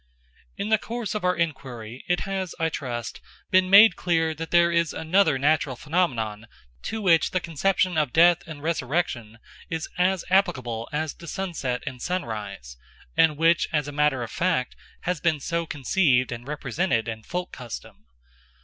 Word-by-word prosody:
In 205 - -3
the 220 -1 +4
course 235 -1 -4
of 210 - -3
our 180 0 +2
enquiry 130 -7 -4
it 175 0 +1
has, 190 -3 -3
I 165 0 +1
trust, 120 -6 -5 0.3
been 185 0 +4
made 200 0 +8
clear 165 -2 +1
that 160 +1 -6
there 170 0 +4
is 170 -1 +1
another 165 -2 +2
natural 145 -1 +1
phenomenon 120 - -1 0.4
to 220 -1 -3
which 165 -4 +4
the 185 - 0
conception 175 +1 0
of 150 -5 0
death 170 +3 +5
and 150 -3 -9
resurrection 135 -7 -2 0.3
is 165 -1 -3
as 185 0 +2
applicable 125 - +1
as 155 0 -2
to 170 - -13
sunset 155 -9 -3
and 125 -1 -6
sunrise, 105 - -4 0.4
and 155 -2 +4
which, 165 +1 +3
as 150 -3 0
a - - -4
matter 145 -3 +1
of 115 - -7
fact, 170 -8 0 0.3
has 180 -3 -2
been 160 -4 +1
so 170 +3 -2
conceived 135 -3 +2
and 120 +1 -7
represented 140 -3 -1
in 110 -1 -5
folk 180 +9 -4
custom. 120 -3 -9
160 Hz, 165 wpm, -25 LUFS, 125-180 Hz, 0.4 s, made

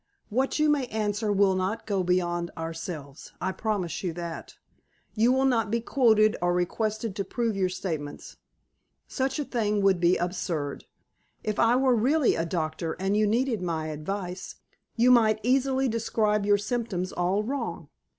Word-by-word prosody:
What 260 +5 0
you 305 0 +3
may 290 -4 +2
answer 210 -1 -1
will 200 -1 +4
not 185 +4 -2
go 200 -3 0
beyond 175 -1 0
ourselves. 165 -3 -7
I 190 +2 -1
promise 190 -3 -2
you 175 -3 -2
that. 170 -1 -7 0.6
You 230 +3 +3
will 265 +1 +2
not 230 -5 +2
be 230 +2 +1
quoted, 220 -3 +3
or 175 0 +2
requested 215 +4 -1
to 200 - -1
prove 230 0 -2
your 190 -2 +1
statements. 160 -6 -5 0.7
Such 265 +1 -1
a 295 - -2
thing 210 -5 0
would 195 -2 +4
be 175 +1 +3
absurd. 170 -5 -3 0.6
If 215 -2 -2
I 230 +1 +4
were 260 0 +3
really 265 +6 +3
a 165 0 -1
doctor, 160 -1 -2
and 195 +3 -1
you 215 0 +3
needed 230 -1 +1
my 160 -3 -2
advice, 180 +4 -5 0.4
you 245 +2 +5
might 220 -3 +5
easily 265 +2 +2
describe 215 -3 0
your 205 0 +5
symptoms 205 -5 -2
all 185 +4 0
wrong. 270 +5 -4
205 Hz, 160 wpm, -27 LUFS, 180-230 Hz, 0.7 s, you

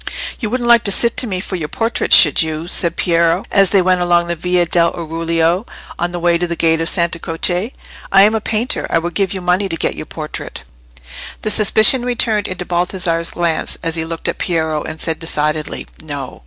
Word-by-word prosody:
"You 220 - -3
wouldn't 240 +1 -2
like 235 -1 +5
to 200 - +2
sit 235 +4 +3
to 250 - +2
me 185 -3 -3
for 190 - -5
your 160 -4 -4
portrait, 225 +8 -2
should 150 -4 +6
you?" 160 0 -3
said 170 -1 +1
Piero, 170 -2 +1
as 195 -2 +4
they 195 -3 +3
went 185 0 +2
along 175 -1 +2
the 170 0 -3
Via 180 +1 0
dell' 170 0 +2
Oriuolo, 165 +3 -1 0.3
on 175 0 -1
the 175 - -4
way 170 0 +2
to 175 - -1
the 170 - -3
gate 165 -1 +1
of 165 - 0
Santa 170 -2 0
Croce. 175 +7 -2 0.4
"I 195 - +6
am 210 +2 +4
a 220 - -1
painter: 225 +3 -1
I - - +2
would 170 +1 -3
give 195 -1 0
you 190 - -4
money 180 +2 0
to 165 - -3
get - - -1
your - - -8
portrait." 155 -1 -7 0.8
The 215 - 0
suspicion 220 +4 +5
returned 230 -4 0
into 185 -1 -5
Baldassarre's 175 -1 -1
glance, 170 -2 -1
as 165 -1 -2
he 160 - -2
looked 165 0 -6
at - - -3
Piero, 160 -3 -1
and 155 +1 -7
said 160 0 -3
decidedly, 155 -1 -2 0.2
"No." 145 -4 -7
175 Hz, 215 wpm, -16 LUFS, 165-195 Hz, 0.8 s, should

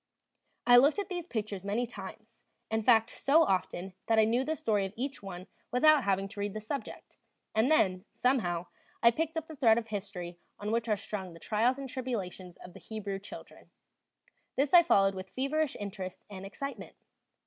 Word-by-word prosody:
I 245 0 +8
looked 280 +8 +5
at 400 -2 -3
these 350 -2 -4
pictures 210 - -4
many 210 +5 0
times; 220 0 -10 0.3
in 220 0 +1
fact, 225 +1 +4
so 310 +4 +4
often 190 - -1
that 225 - +3
I 220 - +6
knew 235 +4 +2
the 315 +3 -1
story 210 -8 +1
of 195 0 -4
each 270 +3 -4
one 185 -2 -7 0.2
without 290 +3 +5
having 195 0 +1
to 210 0 -10
read 205 0 -2
the - - -2
subject, 240 +6 -7 0.4
and 220 +5 +3
then, 190 -11 +3
somehow, 180 -10 0 0.4
I 235 - +8
picked 320 +5 -2
up 320 - -2
the 320 - -10
thread 230 -5 +5
of 225 -1 -3
history 190 -4 -5 0.2
on 205 +1 -3
which 230 0 0
are 210 - +2
strung 190 -3 -6
the 165 - -12
trials 230 +7 +1
and 275 -1 -5
tribulations 200 -9 -5
of 180 - -12
the - - -11
Hebrew 205 -3 -5
children; 195 - -11 0.9
this 275 +3 +1
I 350 - +10
followed 195 -11 +4
with 190 0 -7
feverish 280 +3 -1
interest 195 -2 -6
and 195 0 -7
excitement. 275 +7 -7
220 Hz, 190 wpm, -31 LUFS, 195-260 Hz, 0.9 s, I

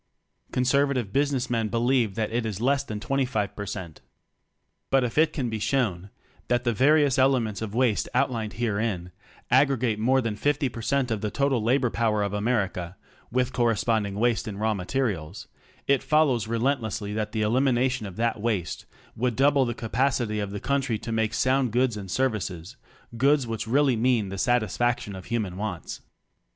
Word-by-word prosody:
Conservative 130 -4 +1
business 140 -3 +1
men 115 -2 0
believe 120 -2 +1
that 110 -1 -2
it 120 +1 0
is 105 -3 -4
less 135 +3 +2
than 110 -6 -5
25 110 -5 -1
per 100 0 -5
cent. 85 -4 -7 0.9
But 135 -1 +3
if 120 -2 -3
it 155 0 +4
can 135 -6 -2
be 110 -1 -3
shown 105 -5 -1 0.4
that 120 0 +1
the 120 -2 +1
various 140 +2 +4
elements 120 -7 +2
of 110 -1 -5
waste 120 -4 +1
outlined 115 -6 0
herein 105 -5 -2 0.4
aggregate 125 -4 +3
more 130 +4 +3
than 115 -4 -2
50 145 +3 0
per 115 - -8
cent 135 0 0
of 110 -2 -1
the 105 - -1
total 135 +2 +1
labor 125 +2 +2
power 110 -3 +1
of 100 0 -2
America 100 -5 -1 0.3
(with 125 +1 0
corresponding 110 -3 +1
waste 115 +1 +1
in 100 -2 -5
raw 110 +1 +1
materials) 100 - -3 0.4
it 140 -2 +3
follows 140 -8 +2
relentlessly 115 -4 -1
that 105 0 -2
the 110 0 -1
elimination 125 0 +1
of 95 - -9
that 115 0 -1
waste 105 -7 -2 0.3
would 125 0 -1
double 140 +1 +4
the 120 -1 -3
capacity 120 -2 0
of 100 -1 -2
the 100 +1 -5
country 135 -3 0
to 115 +2 -6
make 110 -1 0
sound 130 +2 +2
goods 125 0 +1
and 100 -2 -7
services 100 -5 -2 0.2
— 115 - -15
goods 140 +2 +3
which 115 -1 -4
really 135 +1 +3
mean 115 -3 +1
the 95 0 -5
satisfaction 120 -1 0
of 95 - -9
human 110 -6 -2
wants. 100 -4 -5
115 Hz, 175 wpm, -26 LUFS, 105-130 Hz, 0.9 s, it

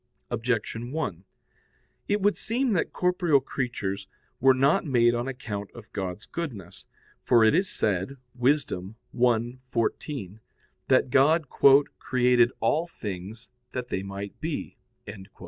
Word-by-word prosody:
Objection 115 0 -2
1: 100 - -3 0.8
It 205 0 +1
would 205 +1 +3
seem 245 +1 -1
that 180 - 0
corporeal 180 -5 +2
creatures 100 -8 -4 0.3
were 130 0 +5
not 135 +2 +3
made 120 -4 +3
on 120 +2 -2
account 105 -6 -5
of 115 -2 -13
God's 95 0 -4
goodness. 120 - -7 0.3
For 120 -2 +4
it 110 - +5
is 185 +4 +2
said 105 +6 -1 0.2
(Wis. 130 +3 +2
1:14) 115 - -2 0.5
that 130 -1 +3
God 145 +2 +4 0.5
"created 125 -1 +3
all 160 +3 +1
things 105 - -7 0.2
that 125 -1 -4
they 95 - -2
might 100 +1 -7
be." 160 -2 -4
125 Hz, 120 wpm, -26 LUFS, 105-140 Hz, 0.8 s, were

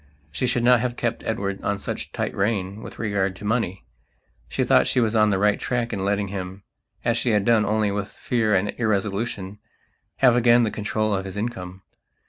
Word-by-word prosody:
She 125 - -1
should 120 -1 0
not 125 0 +6
have 120 +1 -2
kept 115 -1 -2
Edward 100 -2 -2
on 100 - 0
such - - -4
a - - -35
tight - - -3
rein 100 0 -1
with - - -9
regard 100 -3 -1
to 100 - -10
money. 105 -4 -1 0.6
She - - 0
thought - - +4
she - - +2
was 115 -2 +1
on 110 -1 +4
the 100 - +2
right 105 +1 +2
tack 120 -2 -1
in 95 -2 -2
letting 100 0 0
himas 95 0 -6 0.5
she 120 +1 0
had 105 -2 +2
done 115 -2 +4
only 105 -1 +1
with 100 0 -2
fear 110 -1 0
and 95 +2 +1
irresolutionhave 105 -1 -1 0.8
again 120 0 +5
the 110 - 0
control 110 0 -1
of 95 -1 -1
his 95 +1 -7
income. 95 -4 -5
105 Hz, 195 wpm, -24 LUFS, 100-115 Hz, 0.8 s, not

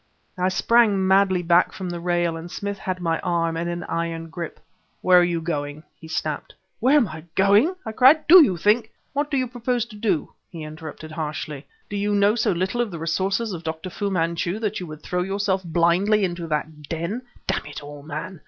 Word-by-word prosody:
I 185 0 +1
sprang 205 -1 +3
madly 190 -1 +3
back 175 +1 +3
from 190 - -5
the 175 -1 -4
rail... 175 -1 0
and 165 +1 -7
Smith 200 +2 -4
had 185 -1 -3
my 165 -1 0
arm 165 -1 0
in 170 +1 -2
an 175 0 -3
iron 165 0 -3
grip. 165 0 -6 0.4
"Where 180 -1 +6
are - - +5
you 175 -1 0
going?" 150 -2 -4
he 160 - -13
snapped. 155 -2 -3 0.2
"Where 265 +6 +5
am 250 -7 +3
I 155 +1 -9
going?" 205 - +4
I - - -3
cried. 265 +7 +5
"Do 355 +1 +10
you 185 -11 +1
think 215 +6 +2
" - - -43
"What 290 +1 -1
do 280 - 0
you 255 -1 0
propose 245 -1 -1
to 235 -3 -13
do?" 205 -7 -1 0.2
he 165 -3 -8
interrupted 155 0 -8
harshly. 155 -2 -5 0.2
"Do 205 - -4
you 205 +1 0
know 200 +1 +4
so 220 -2 +1
little 185 +7 0
of 235 - -1
the 170 - -6
resources 190 +7 -1
of 170 -2 -6
Dr. 160 +2 -5
Fu 200 +3 -2
Manchu 170 +1 -1
that 215 -1 -2
you 180 - -6
would 155 -1 -10
throw 180 0 -1
yourself 195 0 -1
blindly 175 +5 +2
into 175 -2 -4
that 150 -1 -4
den? 170 +8 -3 0.2
Damn - - -1
it 150 0 -8
all, 145 0 -9
man! 155 +4 -6
180 Hz, 215 wpm, -23 LUFS, 165-205 Hz, 0.4 s, Do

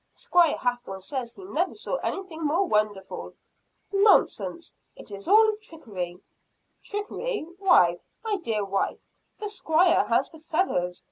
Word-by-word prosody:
Squire 345 -3 +3
Hathorne 245 -6 -3
says 240 +2 -4
he 390 - -11
never 370 -1 -1
saw - - -3
anything 370 -8 -4
more 325 +6 +2
wonderful." 210 - -1 0.6
"Nonsense 395 -4 +3 0.2
it - - -10
is 200 0 -8
all 435 +1 +6
trickery!" 190 - -6 0.6
"Trickery? 415 0 -3
Why, 175 - +5 0.2
my 435 -2 0
dear 220 - -1
wife, 195 0 -1 0.4
the 425 - -4
Squire 360 -4 +3
has - - +2
the 320 - -13
feathers! 310 - -1
320 Hz, 130 wpm, -26 LUFS, -, 0.6 s, all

